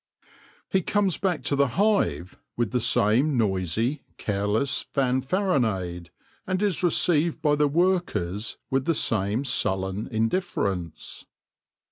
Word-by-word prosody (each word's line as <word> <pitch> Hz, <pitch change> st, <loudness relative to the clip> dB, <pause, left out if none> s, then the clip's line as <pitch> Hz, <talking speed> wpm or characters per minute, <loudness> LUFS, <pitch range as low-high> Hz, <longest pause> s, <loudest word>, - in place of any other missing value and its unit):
He 190 Hz, -, +1 dB
comes 200 Hz, 0 st, +1 dB
back 185 Hz, -5 st, -1 dB
to 140 Hz, -, 0 dB
the 140 Hz, 0 st, +3 dB
hive 200 Hz, -, +1 dB, 0.2 s
with 120 Hz, -4 st, 0 dB
the 125 Hz, -, +1 dB
same 120 Hz, +5 st, +2 dB
noisy, 110 Hz, -, 0 dB, 0.2 s
careless 105 Hz, +6 st, -1 dB
fanfaronade, 125 Hz, -, 0 dB, 0.4 s
and 185 Hz, +2 st, -1 dB
is 200 Hz, -5 st, 0 dB
received 170 Hz, -2 st, +2 dB
by 150 Hz, -2 st, +3 dB
the 150 Hz, 0 st, +3 dB
workers 145 Hz, -, 0 dB
with 135 Hz, 0 st, +1 dB
the 165 Hz, -, +1 dB
same 110 Hz, +1 st, 0 dB
sullen 95 Hz, -4 st, 0 dB
indifference. 110 Hz, -, -2 dB
130 Hz, 115 wpm, -25 LUFS, 100-170 Hz, 0.4 s, the